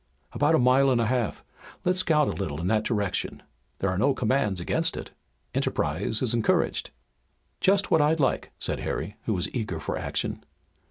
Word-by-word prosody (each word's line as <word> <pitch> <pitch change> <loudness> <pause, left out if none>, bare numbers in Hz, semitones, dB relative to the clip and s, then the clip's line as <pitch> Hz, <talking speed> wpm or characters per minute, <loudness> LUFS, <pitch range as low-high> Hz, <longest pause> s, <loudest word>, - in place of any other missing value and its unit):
"About 150 +2 +3
a - - +5
mile 130 +1 +4
and 125 -2 +3
a 115 - +2
half. 120 -2 -1 0.4
Let's 180 +1 +2
scout 155 -5 +3
a - - 0
little 80 -7 -4
in 85 - -3
that 110 +3 +2
direction. 105 -5 -2 0.3
There 100 - 0
are 95 - -1
no 135 +5 +3
commands 110 -6 +1
against 85 - 0
it. - - -7 0.4
Enterprise 95 - 0
is 120 - +2
encouraged." 115 -2 +1 0.7
"Just 200 +1 +2
what 160 - +5
I'd 155 +2 +3
like," 135 - 0
said - - -2
Harry, 105 - -4
who 110 - 0
was 90 - -2
eager 110 -9 -3
for - - -3
action. - - -3
120 Hz, 180 wpm, -26 LUFS, 100-140 Hz, 0.7 s, a